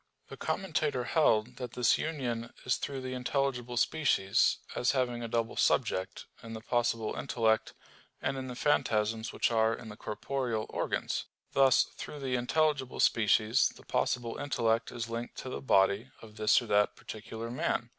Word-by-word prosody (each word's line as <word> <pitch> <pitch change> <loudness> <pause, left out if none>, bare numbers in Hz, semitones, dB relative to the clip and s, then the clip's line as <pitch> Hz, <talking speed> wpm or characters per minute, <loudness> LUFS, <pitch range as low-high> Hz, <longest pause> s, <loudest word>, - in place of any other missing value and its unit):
The - - -7
Commentator 155 -8 -1
held 125 -4 +2
that 125 -2 -6
this 125 0 +3
union 120 -7 -3
is 125 - +2
through 135 -2 -4
the 130 0 -4
intelligible 125 -1 -1
species, 115 -10 +2 0.2
as 125 - +2
having 125 -3 0
a 115 - -3
double 115 0 -1
subject, 95 0 +1 0.2
in 115 0 -8
the 110 - -6
possible 115 -2 0
intellect, 115 -4 0 0.4
and - - -1
in 130 -1 -5
the 125 - -6
phantasms 110 -5 +1
which - - 0
are 110 0 +3
in 110 -1 -10
the 105 - -8
corporeal 115 +1 -3
organs. - - -2 0.3
Thus 135 -2 +5
through 150 - -9
the 135 -2 -3
intelligible 135 +2 +1
species 110 0 +4
the - - -15
possible 120 -2 -1
intellect 115 -4 0
is 120 -1 -4
linked 115 +1 -5
to 130 - -6
the - - -5
body 100 0 +3
of 110 -2 -13
this 110 +3 +4
or - - -7
that 105 -1 +2
particular 110 +2 -7
man. 120 -1 -1
120 Hz, 165 wpm, -31 LUFS, 110-130 Hz, 0.4 s, Thus